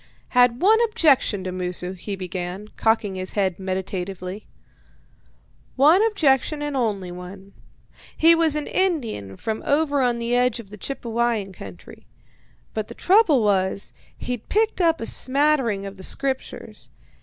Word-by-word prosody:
"Had 245 +2 +3
one 440 +3 +6
objection 280 - +2
to 185 - -4
Moosu," 180 0 -3
he 190 +2 -6
began, 185 +2 -6
cocking 220 -3 +1
his 185 0 -4
head 190 -3 0
meditatively 190 +1 -5 1.3
"one 310 +10 +5
objection, 300 - +1
and 295 -1 -3
only 205 -8 -1
one. 190 +2 -10 0.6
He 330 +1 +7
was 330 -2 +2
an 300 -1 -2
Indian 235 - -1
from 220 -1 -3
over 285 -1 +1
on 245 -2 +1
the 235 +1 -1
edge 250 -1 +2
of 205 -4 -11
the - - -8
Chippewyan 230 -5 -2
country, 95 - -12 0.7
but 215 -1 -3
the - - -10
trouble 355 - +4
was, 195 -1 0 0.2
he'd 245 -3 -5
picked 435 -1 +1
up 330 -1 +2
a - - -2
smattering 260 -6 +1
of 195 0 -8
the 190 - -10
Scriptures. 270 +5 -4
230 Hz, 145 wpm, -23 LUFS, 190-285 Hz, 1.3 s, He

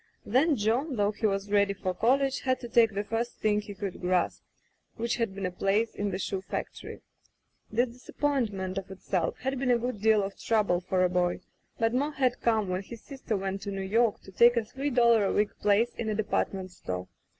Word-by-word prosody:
Then 280 +8 +3
John, 245 +7 0
though 205 -1 +2
he 215 +1 0
was 195 0 -2
ready 200 -1 +3
for 185 -1 -2
college, 270 +7 +2
had 255 -1 0
to 240 - -6
take 225 -3 +4
the 205 - 0
first 225 +3 -3
thing 210 -1 +1
he 205 -1 -9
could 195 -2 -5
grasp, 180 -1 +1 0.5
which 235 +1 -1
had 230 -5 -1
been 195 -1 -3
a 180 - -1
place 200 +5 +1
in 205 0 -2
the 185 - -2
shoe 195 0 -3
factory. 190 - -6 0.7
This 240 +3 +2
disappointment, 230 -7 -2
of 190 - -11
itself, 190 -1 -2
had 265 0 -2
been 265 -1 0
a 245 - +5
good 235 -3 -4
deal 215 -1 +4
of 195 0 -6
trouble 210 -6 +1
for 185 0 +1
a 180 - +3
boy, 180 0 0 0.4
but 225 0 +1
more 285 +4 0
had 255 -3 0
come 220 -3 +2
when 185 +1 -1
his 225 +3 -11
sister 265 -6 -4
went 195 0 -3
to 200 - -5
New 195 0 -3
York 220 +3 +2
to 195 - -13
take 235 +5 +5
a 230 - +1
three 270 +6 -3
doUar 235 -4 +4
a 195 - +1
week 210 0 +1
place 210 +3 +3
in 220 - -3
a 215 - 0
department 195 -3 -1
store. 90 - -5
215 Hz, 215 wpm, -28 LUFS, 195-240 Hz, 0.7 s, a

